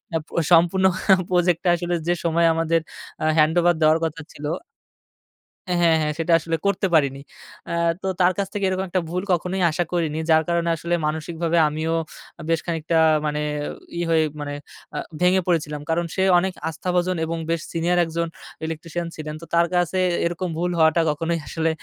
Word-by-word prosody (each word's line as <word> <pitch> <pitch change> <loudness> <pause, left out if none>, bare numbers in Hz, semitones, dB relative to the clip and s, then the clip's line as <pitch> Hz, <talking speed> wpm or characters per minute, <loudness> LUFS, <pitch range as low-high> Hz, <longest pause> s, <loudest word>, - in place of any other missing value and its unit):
আ - - +4
প - - -24 0.2
সম্পূর্ণ 175 +3 +5 0.4
প্রজেক্ট 175 -2 +2
টা - - +4
আসলে 175 0 -2
যে 175 - +3
সময়, 170 0 +3
আমাদের 165 0 +1 0.4
আ - - +1
হ্যান্ডওভার 170 +3 +4
দেওয়ার 155 +1 +5
কথা 160 -1 -4
ছিল 145 - -9 1.2
হ্যাঁ, 180 - +1
হ্যাঁ, 165 -1 +5
হ্যাঁ 150 0 0
সেটা 165 +1 0
আসলে 165 +1 -2
করতে 200 -1 +1
পারিনি। 140 -3 +2 0.5
আ - - -4 0.3
তো - - -3
তার 180 +1 +5
কাছ 200 -1 -1
থেকে 200 -1 -1
এরকম 190 0 -1
একটা 185 +1 0
ভুল 180 +2 -2
কখনোই 180 +2 -1
আশা 175 +3 0
করিনি, 160 -3 0
যার 160 0 +5
কারণে 170 0 +1
আসলে 170 +1 -1
মানসিকভাবে 160 +2 -1
আমিও 155 +2 -2 0.5
আ - - -7
বেশ 165 -1 +2
খানিকটা 165 -1 -1 0.3
মানে 150 0 -1 0.6
ইয়ে 175 - -1
হয়ে, 160 -1 +4 0.2
মানে 145 0 -4 0.4
আ - - -2 0.2
ভেঙে 185 +1 +4
পড়েছিলাম, 150 -4 0
কারণ 170 +1 +1
সে 190 - 0 0.2
অনেক 190 +1 -1 0.2
আস্থাভজন 180 +2 -1
এবং 165 +1 -3
বেশ 165 -1 0
সিনিয়র 170 +2 +1
একজন 170 +1 -2 0.4
ইলেকট্রিশিয়ান 165 +1 -4
ছিলেন, 155 -1 -6
তো 165 - -9
তার 170 0 +4
কাছে 175 +1 +1 0.3
এরকম 175 +2 -2
ভুল 175 +1 0
হওয়াটা 160 +1 +4
কখনোই 165 +3 -1
আসলে 165 0 -1
170 Hz, 180 wpm, -23 LUFS, 160-175 Hz, 1.2 s, সম্পূর্ণ